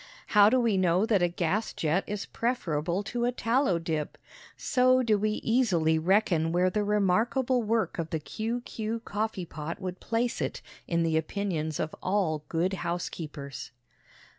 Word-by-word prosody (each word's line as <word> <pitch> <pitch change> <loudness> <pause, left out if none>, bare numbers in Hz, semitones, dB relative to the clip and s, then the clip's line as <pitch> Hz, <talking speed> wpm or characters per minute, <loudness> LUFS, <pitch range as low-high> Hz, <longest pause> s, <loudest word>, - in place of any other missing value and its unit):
How 205 -1 +7
do 255 +3 +3
we 230 -5 +2
know 185 +2 +3
that 210 -4 +2
a 175 - +4
gas 175 +5 -1
jet 165 +4 0
is 205 -1 -3
preferable 180 -6 -1
to 240 +3 -2
a 245 - +2
tallow 245 -4 +1
dip? 160 -3 -3 0.4
So 255 -1 +3
do 220 -3 +3
we 210 +1 0
easily 175 -10 +2
reckon 170 -2 +2
where 180 +2 +2
the 210 +2 0
remarkable 220 +6 +2
work 220 -3 0
of 165 -1 -2
the 160 - -1
Q. 225 +9 -3
Q. 225 -1 -4
coffee 210 -4 -3
pot 155 +2 -6
would 185 -1 -5
place 235 +2 -1
it - - -3 0.2
in 170 -1 +1
the 160 -1 +1
opinions 160 -2 -2
of 155 - -2
all 180 -6 0
good 175 +3 0
housekeepers. 150 -6 -5
195 Hz, 165 wpm, -28 LUFS, 165-225 Hz, 0.4 s, How